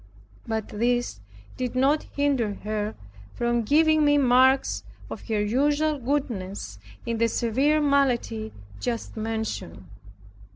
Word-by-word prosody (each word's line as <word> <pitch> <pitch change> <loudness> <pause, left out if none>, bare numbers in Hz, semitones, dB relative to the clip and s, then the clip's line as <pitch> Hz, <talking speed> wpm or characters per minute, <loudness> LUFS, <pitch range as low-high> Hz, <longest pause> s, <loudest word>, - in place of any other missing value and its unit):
But 220 -2 -2
this 240 - 0 0.4
did 250 -1 -3
not 275 +4 +2
hinder 270 -8 +1
her 210 0 -2 0.4
from 240 0 +1
giving 310 +6 +4
me 290 0 +4
marks 260 0 +3 0.3
of - - -8
her 210 -2 0
usual 290 +6 +1
goodness, 205 - -3 0.3
in 230 -1 -2
the 230 - +4
severe 265 +7 +1
malady 255 -6 +1 0.3
just 235 -2 -4
mentioned. 220 - -4
240 Hz, 115 wpm, -25 LUFS, 220-280 Hz, 0.4 s, giving